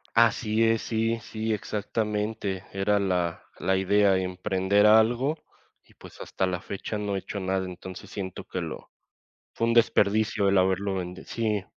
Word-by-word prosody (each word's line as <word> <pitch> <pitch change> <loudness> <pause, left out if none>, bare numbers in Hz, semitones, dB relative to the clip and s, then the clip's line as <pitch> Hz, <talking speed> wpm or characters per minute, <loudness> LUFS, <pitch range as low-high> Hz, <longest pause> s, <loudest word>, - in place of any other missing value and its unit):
Así 115 -1 +3
es. 115 0 +2
Sí, 115 0 0
sí, 110 0 -3
exactamente. 105 -2 -2
Era 100 +1 +1
la 90 -4 -1
la 95 +1 +1
idea 100 +1 +3
emprender 95 +2 +1
algo. 120 +7 +4 0.5
Y - - -24
pues, - - -14
hasta 95 - -2
la 90 -1 -2
fecha 100 +2 -5
no 100 -1 -2
he - - 0
hecho 100 - -6
nada. 95 0 -1
Entonces 90 0 -9
siento 95 -2 -6
que 90 - -4
lo 80 -3 -7 0.6
fue 115 - 0
un 115 - +2
desperdicio 110 -3 +3
el 100 - +3
haberlo 95 +1 +1
vende 90 0 -5
Sí. 110 -4 -1
100 Hz, 160 wpm, -27 LUFS, 95-110 Hz, 0.6 s, algo